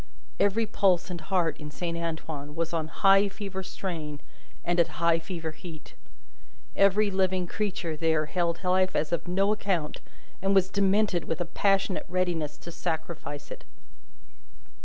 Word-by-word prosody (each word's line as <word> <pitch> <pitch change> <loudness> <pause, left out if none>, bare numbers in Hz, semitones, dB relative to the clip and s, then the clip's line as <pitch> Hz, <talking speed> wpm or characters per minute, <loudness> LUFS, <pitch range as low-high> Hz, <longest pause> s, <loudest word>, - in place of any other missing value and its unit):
Every 210 +3 +3
pulse 190 -4 +2
and 170 -2 -5
heart 165 -2 +1
in 150 - -7
Saint 170 +3 -3
Antoine 160 -3 -4
was 165 0 -2
on 160 -2 0
high 195 +4 +5
fever 195 -1 -5
strain 160 -6 -5 0.5
and 175 0 +1
at 165 -2 +2
high 170 0 +3
fever 165 -2 -5
heat. 160 0 -11 0.8
Every 200 +1 +4
living 185 -1 +1
creature 185 -4 -2
there 160 -1 +2
held 170 +2 -1
life 185 0 +2
as 150 - +1
of 170 - -1
no 195 +3 +2
account, 185 -7 -1 0.4
and 195 +1 +2
was 190 -1 +4
demented 200 -2 +2
with 165 - -2
a 175 - 0
passionate 195 +2 +1
readiness 170 -5 -1
to 170 - -9
sacrifice 160 -3 -4
it. - - -8
175 Hz, 150 wpm, -28 LUFS, 160-195 Hz, 0.8 s, high